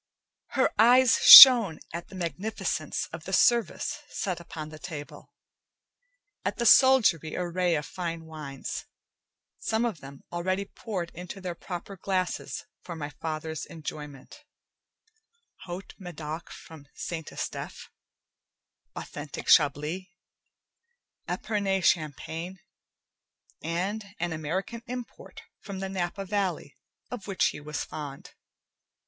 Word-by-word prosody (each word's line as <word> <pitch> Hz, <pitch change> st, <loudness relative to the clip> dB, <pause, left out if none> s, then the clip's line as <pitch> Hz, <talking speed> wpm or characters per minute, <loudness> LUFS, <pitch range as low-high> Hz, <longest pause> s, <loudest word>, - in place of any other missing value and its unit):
Her 260 Hz, -, +3 dB
eyes 245 Hz, +2 st, +6 dB
shone 235 Hz, -, +11 dB, 0.2 s
at 170 Hz, +1 st, -6 dB
the 190 Hz, -, -13 dB
magnificence 180 Hz, +5 st, -3 dB
of -, -, -8 dB
the -, -, -6 dB
service 240 Hz, +5 st, +2 dB
set 185 Hz, -4 st, -3 dB
upon 155 Hz, -2 st, -8 dB
the 155 Hz, 0 st, -11 dB
table, 155 Hz, -5 st, -9 dB, 1.1 s
at -, -, -2 dB
the 235 Hz, -, -1 dB
soldiery 225 Hz, -, +5 dB
array 180 Hz, -1 st, 0 dB
of 150 Hz, -1 st, -3 dB
fine 165 Hz, -3 st, -5 dB
wines, 150 Hz, -4 st, -7 dB, 0.7 s
some 225 Hz, +2 st, -1 dB
of 220 Hz, -10 st, -3 dB
them 135 Hz, 0 st, -12 dB
already 185 Hz, +3 st, -2 dB
poured 190 Hz, -5 st, -6 dB
into 180 Hz, +3 st, -9 dB
their 180 Hz, -2 st, -5 dB
proper 180 Hz, +3 st, -8 dB
glasses 185 Hz, -1 st, -3 dB, 0.2 s
for 170 Hz, -, -8 dB
my 150 Hz, -2 st, -6 dB
father's 155 Hz, +1 st, -5 dB
enjoyment: 150 Hz, -, -9 dB, 1.2 s
Haut 180 Hz, +2 st, -8 dB
Medoc, 165 Hz, -3 st, -7 dB
from 155 Hz, -3 st, -13 dB
St. 165 Hz, -2 st, -6 dB
Estephe, -, -, -6 dB, 1.1 s
authentic 145 Hz, 0 st, -8 dB
Chablis, 155 Hz, +5 st, +3 dB, 1.2 s
Epernay 200 Hz, -3 st, -1 dB
Champagne, 165 Hz, +2 st, -1 dB, 1.0 s
and 200 Hz, +5 st, -4 dB
an 175 Hz, -2 st, -2 dB
American 185 Hz, +9 st, -4 dB
import 245 Hz, -1 st, -9 dB, 0.2 s
from 200 Hz, -2 st, -8 dB
the 195 Hz, 0 st, -4 dB
Napa 190 Hz, +1 st, -3 dB
Valley 190 Hz, -7 st, -2 dB, 0.4 s
of 240 Hz, -6 st, -7 dB
which 195 Hz, -2 st, +1 dB
he -, -, -8 dB
was 150 Hz, 0 st, -4 dB
fond. 145 Hz, -3 st, -8 dB
175 Hz, 115 wpm, -27 LUFS, 155-200 Hz, 1.2 s, shone